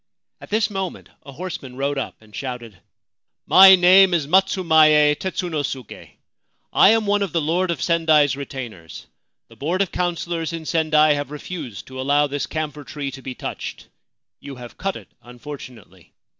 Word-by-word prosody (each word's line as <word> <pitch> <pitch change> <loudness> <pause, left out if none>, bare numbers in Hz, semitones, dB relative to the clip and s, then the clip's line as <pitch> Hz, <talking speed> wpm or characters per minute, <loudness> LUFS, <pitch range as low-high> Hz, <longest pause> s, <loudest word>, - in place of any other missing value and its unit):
At - - -13
this 215 0 0
moment 195 -2 -5
a 140 - -11
horseman 140 -5 -7
rode 140 +1 -1
up - - -6
and 105 -1 -16
shouted: 125 -5 -6 0.4
' - - -62
My 190 0 +10
name 185 +1 +6
is 160 -4 -1
Matsumaye 160 -4 +4
Tetsunosuke. 150 - -5 0.6
I - - +6
am 225 0 +3
one 205 0 +1
of 195 -5 -2
the 170 - +2
Lord 170 +4 0
of 170 -5 -2
Sendai's 160 -4 +3
retainers. 125 - -8 0.4
The - - -18
board 170 +6 -2
of 190 - -8
councillors 170 -2 -3
in 165 -1 -6
Sendai 155 -2 +3
have 145 -1 -4
refused 150 - -8
to. 130 0 -8
allow 145 +2 +2
this 145 -1 -4
camphor 150 -2 -5
tree 140 0 -6
to 135 - -10
be 130 -1 -7
touched. - - -7 0.5
You 140 -1 -9
have 120 -1 -11
cut 195 0 -3
it, - - -11
unfortunately. 125 -2 -12
150 Hz, 165 wpm, -21 LUFS, 135-180 Hz, 0.6 s, My